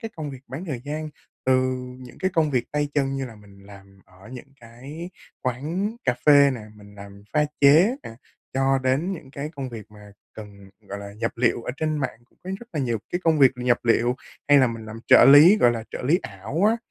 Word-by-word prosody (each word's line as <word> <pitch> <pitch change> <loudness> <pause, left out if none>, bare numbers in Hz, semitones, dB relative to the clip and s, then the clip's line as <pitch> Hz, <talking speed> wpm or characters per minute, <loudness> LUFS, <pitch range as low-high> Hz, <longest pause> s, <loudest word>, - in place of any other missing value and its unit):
cái 225 -3 -6
công 150 -2 -5
việc 130 -2 -10
bán 140 +9 -6
thời 135 -8 -5
gian, 155 +2 -4 0.4
từ 130 0 +3 0.4
những 125 -1 -13
cái 190 0 0
công 155 -2 +2
việc 125 -3 0
tay 145 0 0
chân 135 -2 0
như 135 - -3
là 115 - -11
mình 100 -1 -18
làm 100 -1 -16
ở 95 +4 -18
những 135 +2 -11
cái 135 +9 -10 0.3
quán 160 - -3
cà 130 -2 +2
phê 140 -1 +7
nè, 120 - -7 0.2
mình 100 0 -16
làm 100 0 -12
pha 150 -1 +3 0.2
chế 160 - +5
nè, - - -8 0.4
cho 135 0 +2
đến 140 +9 0
những 155 -7 -9
cái 145 +2 -6
công 135 -2 -4
việc 110 -2 -10
mà 105 -1 -15 0.2
cần, 100 -2 -12
gọi 100 -1 -8
là, 100 0 -9
nhập 115 +2 -3
liệu, 115 -1 +1
ở - - -4
trên 155 0 -1
mạng 130 -4 -4
cũng - - -36
có 185 - -6
rất 240 - -13
là 150 - -2
nhiều 120 -4 -1
cái 175 - -1
công 160 -2 +3
việc 135 -2 +7
nhập 125 -1 +1
liệu, 120 +1 +2 0.3
hay 145 - +7
là 130 - +5
mình 115 -2 -6
làm 115 +1 -9
trợ - - +7
lý, 150 +9 +8
gọi 120 - +4
là 115 -1 -5
trợ - - -6
lý 155 +8 +2
ảo 110 - -3
á. 225 +2 +3
130 Hz, 235 wpm, -23 LUFS, 110-150 Hz, 0.4 s, lý